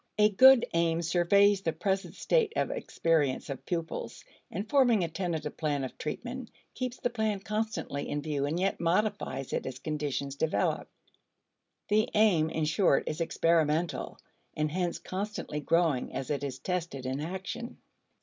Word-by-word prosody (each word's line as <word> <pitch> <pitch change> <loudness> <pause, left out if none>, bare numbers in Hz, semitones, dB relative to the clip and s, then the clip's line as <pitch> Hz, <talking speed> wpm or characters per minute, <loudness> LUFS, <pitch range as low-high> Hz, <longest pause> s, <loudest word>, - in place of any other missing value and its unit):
A 210 0 +6
good 260 +4 +7
aim 170 0 +1
surveys 195 +4 +4
the 165 -4 -1
present 190 +4 -2
state 460 -3 +1
of - - 0
experience 160 - 0
of 135 - -8
pupils, 170 -1 -4 0.2
and 195 +5 -4
forming 240 -6 +4
a - - 0
tentative 160 -3 -3
plan 145 -3 -1
of 130 - -5
treatment, 240 +10 -5 0.2
keeps 255 -1 -4
the 245 - -1
plan 220 -3 0
constantly 215 -8 -3
in 145 0 -2
view 145 -2 -1
and 160 +4 -1
yet 195 +1 0
modifies 170 -7 0
it - - -2
as 130 -1 -5
conditions 140 -1 -3
develop. 160 +3 0 1.0
The 215 +1 +3
aim, 190 -8 +4
in 160 -1 -1
short, 155 -1 +3
is 155 +2 -3
experimental, 165 0 +1 0.4
and 155 0 0
hence 175 0 -1
constantly 190 -5 -4
growing 160 -3 +1
as 135 0 -3
it 145 -1 -1
is 135 -2 -3
tested 165 -4 -3
in 130 +2 -2
action. 190 +8 -5
170 Hz, 155 wpm, -30 LUFS, 150-205 Hz, 1.0 s, good